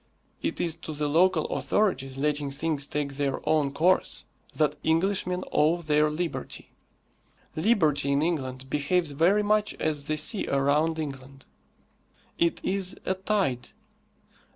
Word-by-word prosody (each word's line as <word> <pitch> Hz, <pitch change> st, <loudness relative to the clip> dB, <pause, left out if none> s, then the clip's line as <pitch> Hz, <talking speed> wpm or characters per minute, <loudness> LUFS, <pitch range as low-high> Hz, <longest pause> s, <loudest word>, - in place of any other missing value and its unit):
It -, -, -2 dB
is 170 Hz, -2 st, 0 dB
to 155 Hz, -, -7 dB
the 150 Hz, 0 st, -1 dB
local 165 Hz, +2 st, +3 dB
authorities 135 Hz, -11 st, 0 dB
letting 145 Hz, 0 st, 0 dB
things 145 Hz, 0 st, -1 dB
take 145 Hz, -2 st, -3 dB
their 140 Hz, -1 st, -1 dB
own 150 Hz, -3 st, +2 dB
course 175 Hz, +6 st, +1 dB, 0.3 s
that 150 Hz, -1 st, +1 dB
Englishmen 180 Hz, +2 st, +1 dB
owe 160 Hz, +3 st, +3 dB
their 150 Hz, -2 st, +2 dB
liberty. 165 Hz, +2 st, -5 dB, 0.8 s
Liberty 155 Hz, -7 st, +2 dB
in 140 Hz, +2 st, +2 dB
England 135 Hz, -6 st, -3 dB
behaves 150 Hz, +4 st, 0 dB
very 175 Hz, +9 st, +3 dB
much 210 Hz, 0 st, +1 dB
as 150 Hz, -2 st, -2 dB
the 155 Hz, +1 st, -1 dB
sea 190 Hz, +7 st, +2 dB
around 145 Hz, +4 st, +1 dB
England. 135 Hz, -3 st, -7 dB, 0.9 s
It 170 Hz, 0 st, +2 dB
is 190 Hz, -1 st, +1 dB
a 190 Hz, -, +1 dB
tide. 190 Hz, -, -1 dB
155 Hz, 130 wpm, -27 LUFS, 140-180 Hz, 0.9 s, local